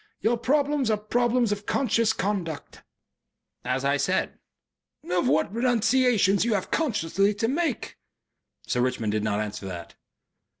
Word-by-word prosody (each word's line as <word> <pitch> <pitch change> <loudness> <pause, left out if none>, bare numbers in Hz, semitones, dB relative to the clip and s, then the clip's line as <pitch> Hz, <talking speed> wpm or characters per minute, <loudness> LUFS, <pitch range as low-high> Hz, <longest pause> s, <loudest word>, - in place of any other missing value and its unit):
Your 230 +2 +2
problems 280 +1 +1
are 215 - +2
problems 240 +2 +1
of 205 0 -4
conscious 230 -4 +2
conduct." 190 -8 -4 0.8
"As 130 +2 -1
I 140 +1 +2
said." - - -1 0.7
"Of 180 -6 +1
what 155 +8 +1
renunciations 235 -3 +3
you 230 -2 +1
have 190 - -3
consciously 205 - +1
to 225 +2 0
make." 295 0 -2 0.7
Sir 125 - 0
Richmond 125 -4 -1
did 105 0 -1
not 105 -1 0
answer 105 -2 -4
that.... 85 -2 -8
210 Hz, 135 wpm, -26 LUFS, -, 0.8 s, renunciations